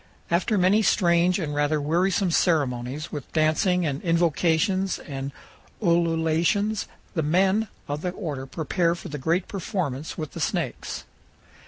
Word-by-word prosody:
After 190 +5 +2
many 190 +4 +4
strange 175 -3 +3
and 155 -6 -3
rather 145 +1 +1
wearisome 180 +5 +1
ceremonies, 140 -4 0
with 145 -4 -7
dancing 170 +3 +2
and 145 -1 -2
invocations 170 +3 +2
and 135 -2 -6 0.5
ululations, 170 +3 +1 0.3
the 160 - 0
men 190 +7 +2 0.2
of 145 +1 -3
the 180 - -1
order 150 -8 -5
prepare 165 +4 0
for - - -9
the 150 -1 -5
great 165 +7 0
performance 170 - -3
with 155 -3 -4
the - - -8
snakes. - - -2
170 Hz, 135 wpm, -25 LUFS, 150-185 Hz, 0.5 s, many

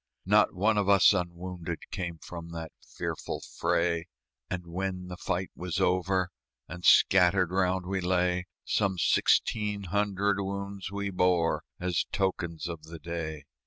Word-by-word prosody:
Not - - +4
one 105 +3 +3
of 100 -1 +1
us 100 0 +7
unwounded 85 -2 -3
Came 85 -3 -4
from 85 +1 -9
the 80 -1 -6
fearful - - -4
fray; 85 -1 0 0.4
And 90 -1 -4
when 90 +1 -4
the 90 - -5
fight 95 +1 -2
was 90 0 -3
over 90 0 +1 0.4
And 90 +2 -8
scattered 90 -1 +5
round 95 0 +1
we 95 +1 -1
lay, 90 0 +1 0.2
Some 95 -2 +1
sixteen 105 +4 +2
hundred 100 +1 0
wounds 100 0 -4
we 100 0 -3
bore 90 -2 +2 0.2
As 90 -1 0
tokens 85 -5 -1
of 85 -2 -6
the 85 +1 -9
day. 80 -2 -5
90 Hz, 140 wpm, -29 LUFS, 85-95 Hz, 0.4 s, us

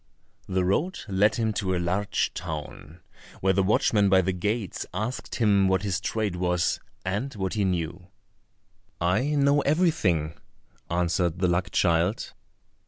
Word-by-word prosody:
The 95 -1 0
road 165 - 0
led 105 +2 +2
him 110 -2 0
to 95 -3 -1
a - - 0
large 90 +4 -1
town, 80 -1 -7 0.4
where 95 0 +2
the 95 - +2
watchman 100 +1 +3
by 95 -1 +5
the 95 - 0
gates 105 +1 -2
asked 110 +6 -4
him 100 -4 +3
what 95 0 +1
his 95 -3 -1
trade 105 -4 -2
was, 90 -1 0 0.3
and 100 +9 -2
what 95 -2 -2
he 105 -2 0
knew. 90 0 -2 0.9
"I 105 - +1
know 140 0 +3
everything," 140 - +1 0.6
answered 85 0 0
the 90 0 +1
luck 90 +1 0
child. 85 +4 +1
95 Hz, 145 wpm, -26 LUFS, 90-105 Hz, 0.9 s, by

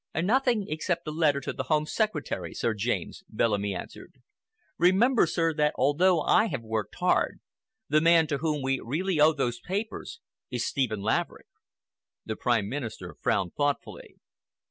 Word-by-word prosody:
"Nothing 225 +4 +2
except 160 +2 -2
a - - -2
letter 150 -3 +2
to - - -4
the 130 - -4
Home 155 -1 +2
Secretary, 210 -3 -2
Sir 115 - 0
James," 120 - -3
Bellamy 105 -3 0
answered. - - -9 0.6
"Remember, 195 +5 +4
sir, 165 0 0
that 150 -1 +1
although 160 +6 +3
I 220 +8 +3
have 120 - -4
worked 110 -2 -3
hard, 180 0 +1 0.5
the 155 0 +3
man 165 0 +5
to 145 -2 -2
whom 150 -3 -1
we 135 0 0
really 165 +7 -1
owe 155 +1 +6
those 120 -5 -2
papers 220 - -5 0.3
is 120 -1 -2
Stephen 115 -7 -1
Laverick." 110 +2 -1 0.8
The 110 - -3
Prime 115 -4 +1
Minister 110 -7 -6
frowned 95 -5 0
thoughtfully. 145 -1 -3
150 Hz, 150 wpm, -27 LUFS, 120-175 Hz, 0.8 s, owe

